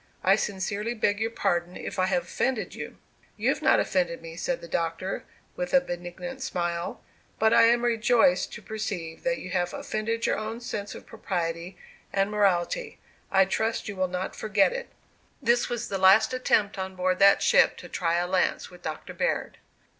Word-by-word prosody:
I 190 +1 +6
sincerely 205 +3 -2
beg 205 -2 +1
your 225 +1 0
pardon, 175 -5 -1
if - - -6
I 185 - +3
have 265 +7 +1
offended 260 -4 -2
you." - - -7 0.4
"You - - +1
have - - 0
not - - +4
offended 175 -3 0
me," 165 0 -9
said 255 +9 -2
the 170 - -10
Doctor, 165 +3 -2 0.3
with 180 +9 -1
a - - +8
benignant 215 +5 -6
smile; 175 -6 -3 0.3
"but 220 +1 +3
I - - +7
am 235 +1 +4
rejoiced 230 -5 +3
to - - -9
perceive 200 -7 -5
that 255 -1 0
you 185 -9 -8
have 180 -1 -1
offended 225 +2 -2
your - - +1
own 220 +2 -4
sense 210 -4 -5
of - - -11
propriety 175 -4 -4 0.3
and 195 +1 +1
morality. 205 - +1 0.3
I 195 -1 +5
trust 220 +4 -1
you 205 - -5
will 185 0 0
not 180 +1 -4
forget 210 - +2
it." - - -5 0.5
This 240 -2 +2
was 240 -1 -3
the 195 - -3
last 190 +6 +6
attempt 210 -5 +1
on 190 0 -4
board 185 0 0
that 200 0 +6
ship - - +5
to - - -9
try 170 -1 0
a 175 +1 +1
lance 185 0 0
with 180 - -14
Doctor - - -6
Baird. - - -2
195 Hz, 185 wpm, -27 LUFS, 180-230 Hz, 0.5 s, a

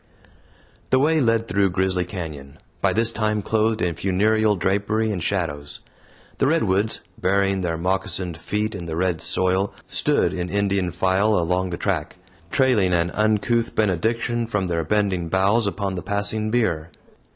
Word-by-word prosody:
The 130 - +4
way 155 +3 +3
led 115 -2 +2
through 100 0 +2
Grizzly 95 0 0
Canyon 75 -7 -7 0.2
by - - +3
this 115 +1 +2
time 105 -2 -1
clothed 110 0 +1
in 85 -1 0
funereal 105 +5 +2
drapery 100 +4 0
and 95 -4 -3
shadows. 75 -6 -2 0.6
The 135 - +3
redwoods, 110 - +1 0.2
burying 95 0 +1
their 85 -2 -1
moccasined 90 0 -1
feet 105 +6 -2
in 95 -4 -6
the 80 - -4
red 90 -1 0
soil, 95 +2 0
stood - - +1
in 90 0 -3
Indian 100 -3 0
file 95 +4 +2
along 90 +2 0
the 85 - -4
track, - - -2 0.3
trailing 110 -6 +2
an 85 0 +1
uncouth 110 +3 +1
benediction 115 +4 0
from 105 -4 -1
their 85 -2 -1
bending 95 -2 0
boughs 100 +5 +2
upon 100 0 -2
the 90 - -4
passing 105 +2 -1
bier. 85 -9 0
100 Hz, 150 wpm, -23 LUFS, 90-110 Hz, 0.6 s, The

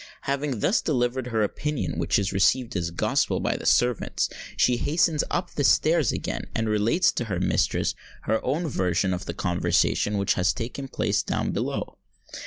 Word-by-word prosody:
Having 140 -4 -2
thus 205 - +2
delivered 125 -3 0
her 110 -3 0
opinion, 150 +7 -2
which - - +2
is 95 -2 -1
received 120 +5 +2
as 85 -2 -1
gospel 85 - 0
by - - 0
the - - -4
servants, 120 -2 +2 0.3
she 125 -1 +3
hastens 155 +2 +1
up 175 0 -2
stairs 155 0 +3
again, - - -4
and 115 0 0
relates 110 - +2
to 120 - -3
her 100 -5 -3
mistress 90 - +1 0.3
her 110 +1 0
own 155 +7 -1
version 95 - 0
of 90 +1 -4
the - - -4
conversation 90 +3 +1
which 100 -1 +2
has 90 +1 +1
taken 125 +3 -5
place - - 0
down - - -2
below. - - -3
120 Hz, 170 wpm, -25 LUFS, 100-140 Hz, 0.3 s, she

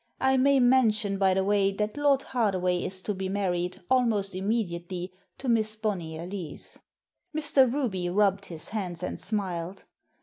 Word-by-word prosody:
I 265 0 +3
may 275 +1 +4
mention, 225 -5 +3
by 190 -1 +3
the 190 - +2
way, 200 0 +2
that 210 +1 -2
Lord 285 -2 +3
Hardaway 185 -7 0
is 185 0 0
to 210 - -1
be 190 0 -4
married, 180 -3 -2
almost 225 -6 +2
immediately, 185 -3 -2 0.2
to 265 - -7
Miss 220 -2 +2
Bonnyer 175 -7 -3
Lees." 180 -6 -5 0.6
Mr. 290 -5 +4
Ruby 210 -11 -1
rubbed 200 +1 +2
his 160 -3 -3
hands 185 -6 -4
and - - -4
smiled. 190 -3 -3
200 Hz, 155 wpm, -27 LUFS, 185-230 Hz, 0.6 s, may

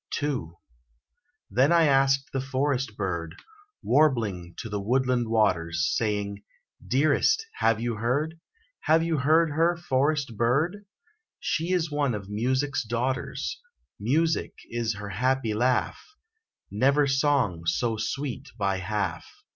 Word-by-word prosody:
II. 135 - -2 1.0
Then 135 +5 +3
I 170 -1 +5
asked 135 -1 +3
the 135 - 0
forest 135 -3 -1
bird, 85 -5 -3 0.5
Warbling 110 - +1
to - - -5
the 105 -1 -3
woodland 125 +2 +1
waters; 85 -7 +1
Saying, 105 -2 -1 0.4
"Dearest, 155 - +2
have 115 -1 +2
you 120 -1 -2
heard, 145 +9 -1 0.4
Have 160 +1 +3
you 165 -1 0
heard 155 +4 +3
her, 165 +3 +2
forest 145 -4 0
bird? 145 - 0 0.5
She 170 -1 -1
is 170 -4 0
one 145 -5 0
of 100 -1 -7
Music's 130 +6 0
daughters 130 - -3 0.4
Music 155 +10 0 0.2
is 115 -2 -1
her 105 0 -7
happy 125 +3 0
laugh; 125 +4 0 0.7
Never 140 +7 +3
song 135 - +1
so 115 +7 +1
sweet 135 +4 -4
by 100 -2 0
half." 100 +2 -3
130 Hz, 125 wpm, -26 LUFS, 105-145 Hz, 1.0 s, I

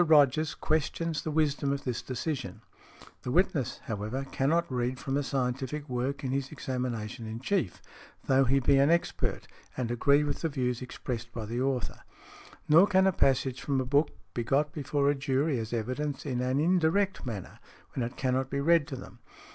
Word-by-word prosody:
Rogers 155 -1 +4
questions 160 +1 -1
the - - -4
wisdom 145 -2 +1
of 140 0 -2
this 125 -3 -2
decision. 130 - -4 0.6
The - - -5
witness, 150 - +1
however, 110 +5 -3
cannot 155 +5 +2
read 125 +1 -1
from 135 0 -3
a 145 - +2
scientific 135 +2 -2
work 130 +3 -2
in 130 - -1
his 135 0 -2
examination 120 -3 -4
in 110 +1 -5
chief, 135 - -1 0.4
though 135 0 +4
he 135 +3 +3
be 135 +1 +4
an 140 +2 +5
expert 170 +1 0 0.3
and 120 -2 -1
agree 140 +4 +4
with 145 -1 -2
the 165 - 0
views 125 -3 -1
expressed 120 -2 -5
by 115 -2 -5
the 120 +3 -2
author. 130 -2 -1 0.7
Nor 165 +6 +7
can 190 -1 +4
a 190 - +5
passage 130 -5 +1
from 140 -2 0
a 130 - -1
book 140 +4 +3 0.2
be 120 - -1
got 145 +5 +1
before 145 -1 0
a 145 - +5
jury 135 0 0
as 110 0 -5
evidence 130 +5 -2
in 125 -3 -1
an 130 +2 +1
indirect 185 +4 +2
manner, 110 -7 -6 0.3
when 130 - -1
it 120 +3 -5
cannot 130 0 0
be 140 - -1
read 160 0 +4
to 135 - -5
them. 120 -2 -11
135 Hz, 185 wpm, -29 LUFS, 125-150 Hz, 0.7 s, Nor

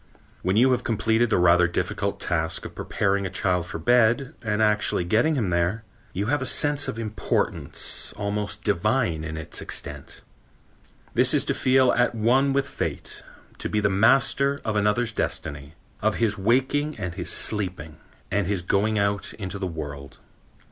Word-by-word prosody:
When 95 +3 0
you 130 +3 +5
have 125 -1 +1
completed 110 0 +1
the - - +2
rather 90 0 +5
difficult 85 - -2
task 80 -1 -1
of - - -8
preparing 100 0 -1
a - - -6
child 90 -2 -1
for - - -5
bed 120 - +2
and 110 -3 -1
actually 105 -4 +2
getting 115 - +2
him 110 -9 -1
there, 85 +6 0 0.3
you 100 +3 -2
have 145 +4 0
a - - -2
sense 145 +1 +2
of - - -4
importance 110 -2 -2
almost 105 0 -3
divine 105 -4 +1
in 80 0 -5
its 80 - -3
extent. - - -4 0.9
This - - +4
is - - +2
to - - 0
feel 130 -1 +3
at 120 -1 +1
one 125 +5 +3
with 140 0 0
Fate, - - -4 0.4
to - - -2
be 105 - 0
the 100 -1 +2
master 135 +7 +3
of 110 - -1
another's 105 +3 +1
destiny, 75 -7 -3 0.3
of 110 0 +1
his 110 -3 +1
waking 130 +8 +1
and 90 -4 -4
his 90 -2 -2
sleeping 90 -8 -1 0.3
and 100 -3 0
his 95 -3 -1
going 105 +4 +1
out 100 0 -1
into 100 -2 -6
the 95 - -2
world. 75 -4 -7
105 Hz, 170 wpm, -24 LUFS, 90-120 Hz, 0.9 s, you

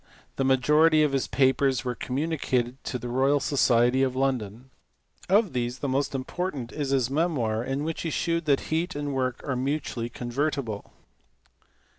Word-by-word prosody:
The 135 - +1
majority 150 +4 +4
of 150 - +2
his 135 -1 0
papers 130 0 +2
were 125 - -1
communicated 130 -2 -2
to 130 - -2
the 120 0 -7
Royal 135 +4 +2
Society 130 -2 +3
of 130 -1 +1
London; 130 -2 -2 0.6
of 200 -4 +3
these 120 0 -2
the 140 - -3
most 140 +1 0
important 135 -2 -4
is 145 -3 -3
his 130 -2 +1
memoir 135 -8 0
in 135 +3 -2
which 160 +1 -3
he 165 - -2
shewed 170 +1 -1
that 140 -3 +3
heat 170 +3 -1
and 145 -1 -3
work 130 0 -2
are 140 - 0
mutually 130 -3 -2
convertible. 120 -2 -3
135 Hz, 160 wpm, -26 LUFS, 125-150 Hz, 0.6 s, majority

